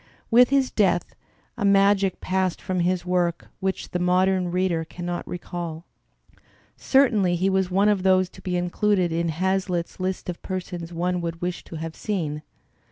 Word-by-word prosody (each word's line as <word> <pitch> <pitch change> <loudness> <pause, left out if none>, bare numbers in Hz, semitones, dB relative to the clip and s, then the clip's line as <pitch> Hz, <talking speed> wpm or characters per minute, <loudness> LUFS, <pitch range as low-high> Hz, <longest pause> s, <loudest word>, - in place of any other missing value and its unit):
With 245 +2 +7
his 275 -1 +2
death 180 -5 +1 0.5
a - - -1
magic 200 -1 +3
passed 185 -1 0
from 185 -1 -2
his 180 +1 0
work 175 -2 0
which 190 0 -3
the 180 - -1
modem 180 0 +2
reader 180 -2 0
cannot 175 +2 -5
recall. 170 -2 -6 0.9
Certainly 220 -10 +3
he 190 +3 +1
was 190 -1 +1
one 195 +3 +3
of 205 -2 +2
those 185 0 +3
to - - -15
be 180 -1 -2
included 180 0 +1
in 170 +1 0
Hazlitt's 185 +1 -1
list 185 0 -3
of 175 -1 -5
persons 180 -3 -5
one 175 +1 -1
would 165 -1 -4
wish 180 0 -3
to - - -9
have 160 0 -5
seen. 160 -8 -3
180 Hz, 165 wpm, -24 LUFS, 175-190 Hz, 0.9 s, With